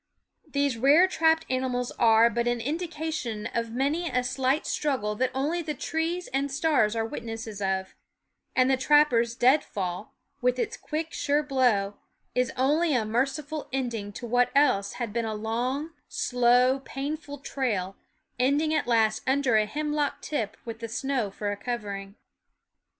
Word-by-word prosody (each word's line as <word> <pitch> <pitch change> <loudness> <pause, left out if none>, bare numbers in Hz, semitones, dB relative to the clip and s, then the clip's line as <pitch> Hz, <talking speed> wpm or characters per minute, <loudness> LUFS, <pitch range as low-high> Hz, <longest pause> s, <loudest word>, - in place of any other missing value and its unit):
These 280 -4 0
rare 295 +9 +6
trapped 320 -3 +2
animals 255 -1 -1
are 225 0 +6
but 235 +1 -1
an 240 0 +1
indica 320 +4 -3
tion 225 -8 -4
of 230 -1 -1
many 290 +8 0
a 250 -1 0
silent 260 +4 0
struggle 260 -8 -1
that 255 +2 +1
only 305 +6 0
the 305 -2 -4
trees 325 +5 -2
and 275 +1 0
stars 270 -7 +2
are 225 0 0
witnesses 225 -2 -6
of; 190 -1 -1 0.6
and 255 -1 +4
the 265 0 +3
trapper's 255 -5 +3
deadfall, 205 - +1 0.3
with 250 0 +2
its 435 - -2
quick, 320 +1 -4
sure 290 +1 +1
blow, 245 -8 +1 0.4
is 250 0 +1
only 295 +4 +2
a 225 -3 +1
merciful 275 +7 -2
ending 235 -6 -3
to 240 - -7
what 245 +1 +2
else 225 -9 +3
had 235 -4 -4
been 235 0 0
a 220 -1 -3
long, 245 +8 -2 0.2
slow, 250 +2 +3
painful 285 +2 -5
trail, 215 -9 -2 0.4
ending 290 +5 +2
at 310 - 0
last 220 -2 +2
under 265 -3 +2
a 215 -1 +3
hemlock 295 +1 -1
tip 225 -9 -3
with 225 -1 -6
the 230 -1 -5
snow 255 -2 -1
for 205 +1 -3
a - - -2
covering. 200 -3 -5
255 Hz, 155 wpm, -27 LUFS, 225-290 Hz, 0.6 s, rare